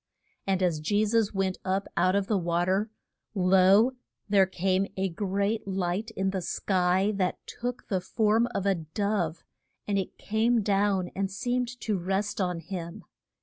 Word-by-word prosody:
And 190 Hz, -1 st, +1 dB
as 170 Hz, -4 st, +1 dB
Je 205 Hz, +7 st, +1 dB
sus 220 Hz, -1 st, +2 dB
went 195 Hz, -2 st, -1 dB
up 190 Hz, +1 st, -1 dB
out 185 Hz, +2 st, +3 dB
of 200 Hz, -1 st, +1 dB
the 200 Hz, -1 st, +1 dB
wa 170 Hz, 0 st, 0 dB
ter, 195 Hz, +4 st, +1 dB, 0.5 s
lo, 190 Hz, +5 st, +5 dB, 0.4 s
there 195 Hz, -2 st, +4 dB
came 190 Hz, +1 st, 0 dB
a 190 Hz, 0 st, 0 dB
great 200 Hz, +4 st, -1 dB
light 190 Hz, +3 st, -1 dB
in 190 Hz, 0 st, +1 dB
the 190 Hz, -1 st, -2 dB
sky, 185 Hz, +2 st, +1 dB
that 185 Hz, -2 st, 0 dB
took 245 Hz, +1 st, -5 dB
the 190 Hz, -4 st, 0 dB
form 220 Hz, +4 st, +2 dB
of 200 Hz, -5 st, -3 dB
a 200 Hz, -, +4 dB
dove, 175 Hz, 0 st, -2 dB, 0.4 s
and 200 Hz, -1 st, +1 dB
it 190 Hz, -, -5 dB
came 225 Hz, +2 st, +1 dB
down 195 Hz, -2 st, +1 dB
and 195 Hz, 0 st, -1 dB
seemed 245 Hz, +4 st, -2 dB
to 210 Hz, -4 st, -1 dB
rest 195 Hz, +3 st, -1 dB
on 180 Hz, -2 st, -1 dB
him. 180 Hz, +2 st, -6 dB
195 Hz, 165 wpm, -28 LUFS, 185-210 Hz, 0.5 s, lo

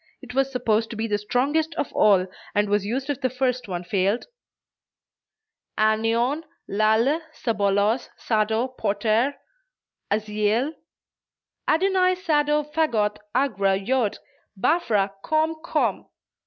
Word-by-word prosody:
It 245 Hz, -, -10 dB
was 270 Hz, +1 st, +1 dB
supposed 225 Hz, -3 st, +1 dB
to 235 Hz, -, -6 dB
be 220 Hz, +1 st, -2 dB
the 205 Hz, -2 st, 0 dB
strongest 290 Hz, +9 st, 0 dB
of 290 Hz, -, -3 dB
all, 195 Hz, -3 st, +4 dB, 0.3 s
and 205 Hz, 0 st, +3 dB
was 205 Hz, -1 st, +2 dB
used 260 Hz, +5 st, -2 dB
if 280 Hz, -, -5 dB
the 255 Hz, -, +1 dB
first 250 Hz, -1 st, -1 dB
one 180 Hz, -2 st, -4 dB
failed: 195 Hz, +4 st, 0 dB, 1.5 s
"Anion, 225 Hz, +7 st, +2 dB, 0.2 s
Lalle, 220 Hz, +9 st, +2 dB
Sabolos, 210 Hz, 0 st, +1 dB
Sado, 220 Hz, +2 st, 0 dB
Poter, 225 Hz, +3 st, 0 dB, 0.7 s
Aziel, 215 Hz, +6 st, 0 dB, 0.9 s
Adonai 370 Hz, +2 st, +3 dB
Sado 300 Hz, -4 st, +1 dB
Vagoth 265 Hz, -9 st, 0 dB, 0.2 s
Agra, 200 Hz, -8 st, +2 dB
Jod, 225 Hz, +2 st, 0 dB, 0.4 s
Baphra! 210 Hz, -, +1 dB
Komm! 315 Hz, +4 st, 0 dB
Komm!" -, -, 0 dB
230 Hz, 115 wpm, -24 LUFS, 210-280 Hz, 1.5 s, all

